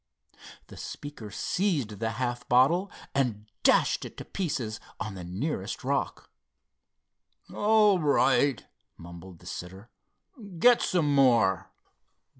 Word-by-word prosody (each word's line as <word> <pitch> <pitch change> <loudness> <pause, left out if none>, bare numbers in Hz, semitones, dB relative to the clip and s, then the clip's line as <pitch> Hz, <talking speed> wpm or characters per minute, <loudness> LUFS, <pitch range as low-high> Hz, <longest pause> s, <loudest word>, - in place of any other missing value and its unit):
The - - -13
speaker 145 -7 -8
seized 140 - -1
the 115 0 -2
half 120 +1 -2
filled 120 - -23
bottle 165 +11 +3 0.2
and 120 -6 -1 0.2
dashed - - +3
it - - -9
to - - -8
pieces 125 - -3 0.2
on 110 - -4
the 95 -2 -8
nearest 95 - -4
rock. - - -2 1.2
"All 210 -2 +4
right," 145 -4 +2 0.3
mumbled 85 +1 -11
the - - -19
sitter. 95 +6 -8 0.7
"Get 245 +7 +5
some 155 -5 +1
more." 120 -9 +3
125 Hz, 115 wpm, -28 LUFS, 105-155 Hz, 1.2 s, Get